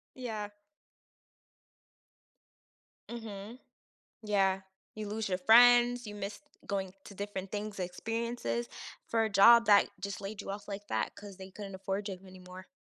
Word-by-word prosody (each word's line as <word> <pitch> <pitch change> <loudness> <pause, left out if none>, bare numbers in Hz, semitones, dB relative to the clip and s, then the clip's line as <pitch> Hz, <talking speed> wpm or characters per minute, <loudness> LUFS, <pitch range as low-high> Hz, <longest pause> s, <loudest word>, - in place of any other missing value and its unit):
Yeah. 215 -5 -5 2.6
Mhm. 225 0 -8 0.6
Yeah. 195 -2 +1 0.3
You 215 -1 -5
lose 220 0 -3
your 185 - -1
friends, 245 +3 +6
you 210 - -7
miss 205 +3 -6 0.3
going 190 -2 -2
to 200 - -11
different 195 -1 -5
things 210 -1 -4
experiences 190 - -3 0.4
for 225 -1 +1
a 220 - 0
job 230 +4 +7
that 205 -1 +6
just 200 +1 -5
laid 200 +1 -6
you - - -6
off 200 +1 -6
like 205 0 -7
that 110 -1 -1
'cause 205 -2 -11
they 190 0 -10
couldn't 195 -1 -8
afford 195 +2 -3
you 190 -2 -5
anymore. 185 0 -12
205 Hz, 140 wpm, -31 LUFS, 190-220 Hz, 2.6 s, job